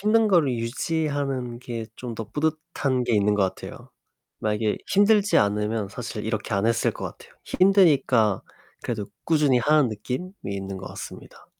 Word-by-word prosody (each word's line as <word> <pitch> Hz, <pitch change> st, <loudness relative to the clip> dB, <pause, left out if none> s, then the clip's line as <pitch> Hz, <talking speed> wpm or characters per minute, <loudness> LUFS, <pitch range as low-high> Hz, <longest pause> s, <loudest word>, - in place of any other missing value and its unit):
힘든 220 Hz, +1 st, +3 dB
거를 170 Hz, -8 st, +4 dB
유지하는 135 Hz, 0 st, -2 dB
게 115 Hz, -2 st, -6 dB
좀 125 Hz, -2 st, -6 dB
더 115 Hz, -, -5 dB
뿌듯한 150 Hz, -1 st, -1 dB
게 120 Hz, -, 0 dB
있는 105 Hz, 0 st, +3 dB
것 105 Hz, -, +2 dB
같아요. -, -, -10 dB, 0.5 s
만약에 105 Hz, 0 st, 0 dB
힘들지 205 Hz, +1 st, +4 dB
않으면 105 Hz, +1 st, 0 dB
사실 110 Hz, 0 st, -6 dB
이렇게 110 Hz, -1 st, -2 dB
안 100 Hz, +2 st, +1 dB
했을 115 Hz, 0 st, +2 dB
것 -, -, -7 dB
같아요. -, -, -9 dB
힘드니까 145 Hz, -, +4 dB, 0.4 s
그래도 105 Hz, -4 st, -3 dB, 0.2 s
꾸준히 150 Hz, -6 st, +3 dB
하는 150 Hz, +1 st, +3 dB
느낌이 125 Hz, -, -4 dB, 0.2 s
있는 95 Hz, -1 st, -4 dB
것 95 Hz, -, -9 dB
같습니다. -, -, -10 dB
125 Hz, 330 characters per minute, -25 LUFS, 105-155 Hz, 0.5 s, 거를